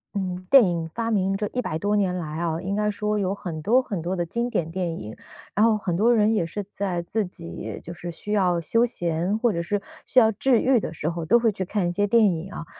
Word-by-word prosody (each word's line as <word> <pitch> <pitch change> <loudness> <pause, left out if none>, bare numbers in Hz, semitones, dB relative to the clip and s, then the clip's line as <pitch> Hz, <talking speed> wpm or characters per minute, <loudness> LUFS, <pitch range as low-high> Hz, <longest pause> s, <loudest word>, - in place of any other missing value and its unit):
嗯， 185 -2 -3
电 270 -4 +8
影 170 -3 -1
发 230 0 -1
明 195 -2 +1
这 210 0 -2
100 250 -11 -2
多 205 +4 0
年 190 -3 +1
来 160 -3 -4
啊， 165 -1 -1
应 195 +2 -2
该 210 0 +1
说 210 0 -1
有 195 0 -1
很 170 -6 -6
多 240 +10 +4
很 205 -9 -4
多 175 +3 -2
的 175 -2 -1
经 235 +8 -2
典 165 -9 -1
电 175 -2 -2
影， 105 +1 -8 0.4
然 210 - +3
后 225 -2 +3
很 195 -5 -2
多 230 +6 +4
人 215 0 +3
也 205 -6 +1
是 200 +5 -5
在 190 -3 -3
自 210 +5 -1
己 170 -2 -8
就 170 - -7
是 175 +1 -7
需 175 +5 -7
要 185 -4 +2
休 230 +8 +3
闲 175 -2 -1
或 240 0 +2
者 170 - -1
是 200 +4 -2 0.2
需 255 - +4
要 220 -2 +5
治 235 +3 +2
愈 260 -2 +4
的 165 - -5
时 155 -1 -2
候 170 -1 -4
都 235 - +5
会 230 -2 +2
去 190 -2 -4
看 195 -1 -1
一 - - 0
些 205 +3 0
电 225 +1 +5
影 175 +3 -5
啊， 165 - -7
195 Hz, 270 characters per minute, -24 LUFS, 170-215 Hz, 0.4 s, 电